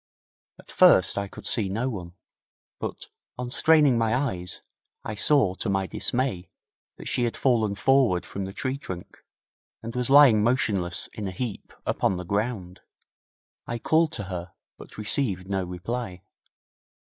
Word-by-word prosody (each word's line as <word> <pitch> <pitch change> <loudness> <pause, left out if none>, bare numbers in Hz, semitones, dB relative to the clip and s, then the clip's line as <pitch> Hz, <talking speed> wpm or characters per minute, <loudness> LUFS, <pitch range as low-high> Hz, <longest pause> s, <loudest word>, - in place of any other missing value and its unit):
At - - -15
first - - +5
I 100 - -3
could - - -12
see 105 -5 +1
no 115 +6 -1
one, 90 -8 -6 0.7
but, - - -6 0.3
on 125 0 -5
straining 150 -4 +4
my 115 0 +1
eyes, 95 -10 -3 0.4
I - - -4
saw, 110 -2 +3
to 100 - -4
my 95 0 0
dismay, 105 -5 -2 0.5
that - - -9
she 120 - +1
had 115 - -3
fallen 110 -6 +2
forward 125 -5 +3
from 100 -1 -5
the 95 - -6
tree 130 +6 -3
trunk, 90 -10 -9 0.6
and 115 +1 -6
was 125 0 -1
lying 135 -7 +7
motionless 105 -7 +1
in 105 -2 -5
a - - -4
heap 110 +3 -5
upon 95 - 0
the 90 - -6
ground. 100 -2 -3 0.9
I 120 - -3
called 160 +6 +2
to 105 - -3
her, 90 -2 -6 0.2
but - - -14
received 105 -4 0
no 95 -1 -1
reply. 90 +2 -5
105 Hz, 155 wpm, -26 LUFS, 95-125 Hz, 0.9 s, lying